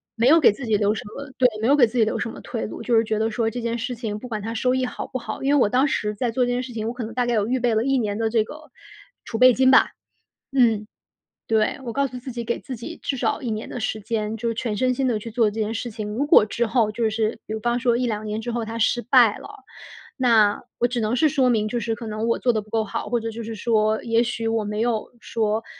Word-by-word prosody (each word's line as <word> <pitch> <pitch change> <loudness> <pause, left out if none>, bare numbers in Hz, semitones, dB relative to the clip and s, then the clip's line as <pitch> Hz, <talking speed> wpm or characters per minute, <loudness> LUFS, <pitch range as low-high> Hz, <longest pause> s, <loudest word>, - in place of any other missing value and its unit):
没 235 +2 +2
有 325 +2 +7
给 300 - +6
自 245 +4 -7
己 215 -2 +2
留 210 +1 +1
什 - - -5
么 280 0 -7
对， 250 - +5
没 225 - +1
有 285 - +5
给 255 -5 +6
自 230 +3 -8
己 - - +6
留 215 - -1
什 - - -2
么 - - -10
退 235 - -4
路， - - -7
就 235 +1 +1
是 225 - +4
觉 215 -1 -1
得 220 +1 +1
说 225 0 -1
这 245 - -5
件 235 0 -2
事 245 +2 -3
情 220 -3 -4
不 250 - -8
管 215 -3 -4
它 225 +2 -5
收 250 +3 +1
益 260 0 0
好 250 - -4
不 255 - -5
好。 235 - -6
因 280 +2 +2
为 285 - +4
我 205 - +3
当 260 +5 +3
时 210 -5 -1
在 235 +2 -1
做 250 +2 +1
这 - - +1
件 245 +1 -1
事 250 -2 -8
情， 220 0 -3
我 235 - -2
可 245 -2 -5
能 225 +1 -6
大 245 0 0
概 240 - +1
有 210 0 +1
预 255 +1 0
备 235 -2 +1
了 220 - +2
1 270 -1 +2
年 210 -2 -2
的 225 -1 0
这 225 -2 +3
个 305 +7 -12 0.5
储 225 - -4
备 255 0 +7
金 260 +1 +4
吧。 260 - +6 0.6
嗯， 225 -5 +3 0.6
对， 220 +4 +1
我 235 - -4
告 280 +2 +1
诉 255 - -8
自 255 +1 -8
己， 235 -1 -5
给 235 - -2
自 260 -3 -7
己 320 +9 -8
至 270 - -2
少 250 - -1
1 240 - -3
年 215 +1 -4
的 245 - -6
时 220 0 -2
间， 215 0 -2
就 230 +1 -2
是 230 - -1
全 225 -3 -3
身 255 +1 +1
心 265 0 0
地 225 -3 0
去 230 - -8
做 225 -2 +2
这 220 +2 -5
件 215 +1 -1
事 235 +1 -4
情。 215 -1 -5
如 235 +7 -1
果 210 - +7
之 235 +2 -1
后 220 -2 +1
就 225 0 0
是 220 0 -1
比 215 - -4
方 240 +2 0
说 240 -2 +2
1-2 220 -4 -2
年 215 +1 -3
之 240 +1 -4
后 235 -1 -2
它 225 +1 -5
失 240 +2 +1
败 240 -4 +5
了， - - -10 0.7
那 225 -6 +3 0.2
我 240 - +3
只 245 -1 -2
能 220 +3 0
是 310 +4 +4
说 265 -3 +2
明 215 -2 +1
就 235 +2 -2
是 225 0 -2
可 235 -1 -8
能 215 +2 -3
我 230 - +1
做 245 - +2
得 215 -2 -1
不 215 - -19
够 225 -1 0
好， 200 - -4
或 240 - +1
者 225 0 -4
就 230 +1 -6
是 225 0 -6
说 215 -1 +1
也 230 0 +2
许 230 -1 -3
我 225 -1 +1
没 210 +1 -3
有 230 -2 -1
说， 220 0 -1
230 Hz, 315 characters per minute, -23 LUFS, 220-245 Hz, 0.7 s, 有